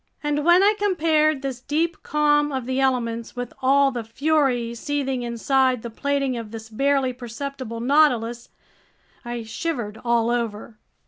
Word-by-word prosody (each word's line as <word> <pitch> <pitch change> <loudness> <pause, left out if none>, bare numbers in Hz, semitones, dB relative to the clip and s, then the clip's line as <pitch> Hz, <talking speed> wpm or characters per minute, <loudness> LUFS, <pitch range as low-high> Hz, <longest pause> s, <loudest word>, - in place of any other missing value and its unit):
And 295 0 0
when 345 +4 +6
I 415 +1 +5
compared 310 -7 +2
this 265 -3 -3
deep 315 +6 -1
calm 295 -1 +2
of 260 -3 -3
the 260 +1 -1
elements 235 -4 -1
with 245 -1 -5
all 275 +1 +4
the 240 -3 -4
fury 255 -1 0
seething 270 +1 -2
inside 250 +1 +1
the 235 - -6
plating 275 +1 -1
of 230 -2 -6
this 225 0 -9
barely 270 +2 +1
perceptible 245 -1 -6
Nautilus, 240 -4 +2 0.7
I 240 -1 -5
shivered 225 -3 -4
all 235 -1 +2
over. 225 -2 -3
260 Hz, 145 wpm, -23 LUFS, 235-290 Hz, 0.7 s, when